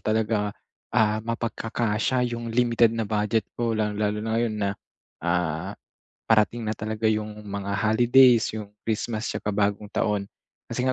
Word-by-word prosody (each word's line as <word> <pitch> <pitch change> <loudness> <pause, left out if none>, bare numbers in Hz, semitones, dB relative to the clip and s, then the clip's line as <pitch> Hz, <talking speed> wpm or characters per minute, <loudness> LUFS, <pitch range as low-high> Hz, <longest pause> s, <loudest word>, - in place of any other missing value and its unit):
talaga, 110 -1 0 0.4
ah, 110 0 +2
mapagkakasya 115 +1 -1
yung 120 0 -4
limited 115 -1 +3
na 115 - 0
budget 105 +1 0
ko. 115 -2 -1
Lalong-lalo 105 -1 0
na 110 - -2
ngayon 115 -1 +1
na, 100 -2 0 0.5
ah, 85 -2 -1 0.5
parating 110 +1 +2
na 110 - -2
talaga 110 +1 -1
yung 105 0 -2
mga 100 0 -4
holidays, 120 +2 +5
yung 105 -2 -6 0.2
Christmas 110 0 -2
tsaka - - -4
bagong 105 0 0
taon. 105 -2 -1 0.4
Kasi 125 - -2
nga 130 - +2
110 Hz, 145 wpm, -25 LUFS, 105-115 Hz, 0.5 s, holidays